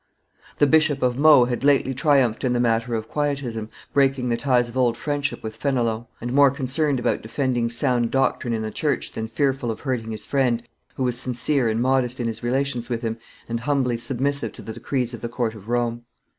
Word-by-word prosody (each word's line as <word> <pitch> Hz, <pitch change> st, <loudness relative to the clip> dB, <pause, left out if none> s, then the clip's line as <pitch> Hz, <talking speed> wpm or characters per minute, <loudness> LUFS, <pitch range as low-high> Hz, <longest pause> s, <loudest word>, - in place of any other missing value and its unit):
The 145 Hz, -, +5 dB
Bishop 150 Hz, -2 st, +3 dB
of 125 Hz, -1 st, +2 dB
Meaux 145 Hz, -2 st, +6 dB
had 120 Hz, +1 st, -3 dB
lately 140 Hz, -2 st, +3 dB
triumphed 135 Hz, -4 st, +2 dB
in 125 Hz, -2 st, +1 dB
the 120 Hz, -, +1 dB
matter 115 Hz, 0 st, +1 dB
of 110 Hz, 0 st, -4 dB
Quietism, 135 Hz, -7 st, -2 dB, 0.2 s
breaking 135 Hz, -2 st, +2 dB
the 120 Hz, -, +2 dB
ties 125 Hz, 0 st, +2 dB
of 120 Hz, -, -11 dB
old 125 Hz, -3 st, +2 dB
friendship 145 Hz, -1 st, -2 dB
with 110 Hz, 0 st, -5 dB
Fenelon, 120 Hz, -4 st, -1 dB
and 120 Hz, +2 st, -4 dB
more 140 Hz, 0 st, +6 dB
concerned 140 Hz, +1 st, 0 dB
about -, -, 0 dB
defending 120 Hz, 0 st, -1 dB
sound 120 Hz, -1 st, +1 dB
doctrine 135 Hz, -2 st, 0 dB
in 110 Hz, -1 st, -1 dB
the 110 Hz, -, -4 dB
church 150 Hz, +6 st, -1 dB
than 110 Hz, 0 st, -4 dB
fearful 135 Hz, +1 st, 0 dB
of 110 Hz, -, -4 dB
hurting 125 Hz, -5 st, -2 dB
his 110 Hz, -2 st, -6 dB
friend, 125 Hz, -4 st, +1 dB, 0.3 s
who 130 Hz, -, -2 dB
was 125 Hz, -1 st, 0 dB
sincere 125 Hz, 0 st, +1 dB
and 110 Hz, +2 st, 0 dB
modest 130 Hz, -1 st, +1 dB
in 120 Hz, -, -1 dB
his 115 Hz, -1 st, -3 dB
relations 125 Hz, 0 st, -1 dB
with 120 Hz, 0 st, -2 dB
him, 115 Hz, 0 st, -3 dB, 0.3 s
and 115 Hz, 0 st, -2 dB
humbly 130 Hz, -2 st, 0 dB
submissive 135 Hz, +4 st, -1 dB
to -, -, -11 dB
the 110 Hz, -, -6 dB
decrees 125 Hz, +1 st, -2 dB
of 120 Hz, -, -7 dB
the 120 Hz, -, -4 dB
court 120 Hz, -2 st, -2 dB
of 110 Hz, 0 st, -12 dB
Rome. 120 Hz, -1 st, -1 dB
125 Hz, 210 wpm, -23 LUFS, 115-135 Hz, 0.3 s, Meaux